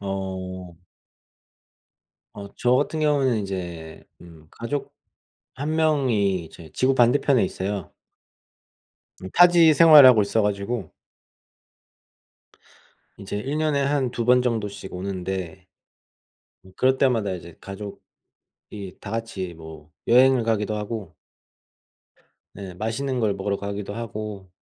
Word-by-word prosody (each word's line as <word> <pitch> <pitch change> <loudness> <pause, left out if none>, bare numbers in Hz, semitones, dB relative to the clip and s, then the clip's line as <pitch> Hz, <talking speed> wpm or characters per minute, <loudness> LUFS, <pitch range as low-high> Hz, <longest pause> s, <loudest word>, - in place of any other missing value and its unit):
어. 95 -3 -6 1.5
어 100 -1 -8
저 125 +1 +2
같은 145 +3 -1
경우는 140 -6 +2
인제 90 -5 -6 0.2
음 80 -3 -15
가족 135 +5 -5 0.6
1 145 +4 -3
명이 125 - +1
이제 80 0 -14
지구 130 +1 +1
반대편에 125 0 +3
있어요. 95 -2 -5 1.3
음 95 - -6
타지 175 -2 +6
생활하고 145 -9 +8
있어 100 +3 0
가지고 105 +4 -2 2.3
이제 100 0 -6
1 140 +8 -3
년에 155 -3 +1
한 140 -3 0
2 120 -1 -3
번 125 +1 +5
정도씩 105 -5 -3
오는데 95 -1 -5 1.0
음 95 - -17
그럴 130 +1 +2
때마다 115 -7 +1
이제 85 -1 -11
가족이 100 +1 -10 0.8
다 100 - -9
같이 110 -6 -4
뭐 80 -2 -13 0.2
여행을 130 0 +5
가기도 110 -2 -1
하고 105 -5 -6 1.4
네 95 -3 -9
맛있는 115 +7 -3
걸 105 -3 +1
먹으러 100 +1 -2
가기도 100 0 -6
하고 105 -4 -7
105 Hz, 210 characters per minute, -23 LUFS, 95-130 Hz, 2.3 s, 생활하고